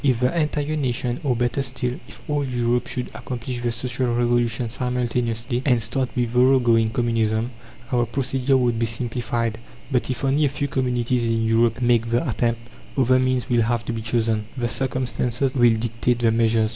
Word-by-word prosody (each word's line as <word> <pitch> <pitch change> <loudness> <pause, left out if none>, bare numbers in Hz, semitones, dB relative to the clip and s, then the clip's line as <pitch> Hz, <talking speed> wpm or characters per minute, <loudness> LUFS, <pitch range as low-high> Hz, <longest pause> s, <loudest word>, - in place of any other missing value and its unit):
If 130 -5 +2
the 125 +6 +1
entire 150 -1 0
nation, 125 -3 -1
or, 130 -4 +1
better 120 +3 0
still, 125 -1 -2
if - - -13
all 145 -1 0
Europe 120 -2 0
should 125 -1 -4
accomplish 125 0 -5
the 120 -1 0
Social 125 +2 -2
Revolution 120 -1 +1
simultaneously, 120 -1 -1
and 125 -4 +3
start 125 +3 0
with 120 -1 -1
thorough 130 +2 +5
going 115 -3 +3
Communism, 115 0 0 0.4
our 120 -2 +2
procedure 135 +2 +1
would 120 -3 +1
be 115 - +1
simplified; 115 -1 -2 0.3
but 125 -1 0
if 130 +1 -3
only 140 +3 +3
a - - +2
few 140 +1 -2
communities 125 -2 0
in 115 -1 +1
Europe 115 +2 +2
make 120 -1 +2
the 120 +7 +1
attempt, 115 -1 0 0.4
other 130 -1 +4
means 130 -1 0
will 120 -3 +2
have 115 0 0
to 120 - -3
be 115 - -4
chosen. 110 -1 0
The 120 -1 -1
circumstances 130 0 -1
will 120 -3 +4
dictate 115 +2 0
the 115 -1 +2
measures. 115 -1 +2
120 Hz, 185 wpm, -23 LUFS, 115-130 Hz, 0.4 s, thorough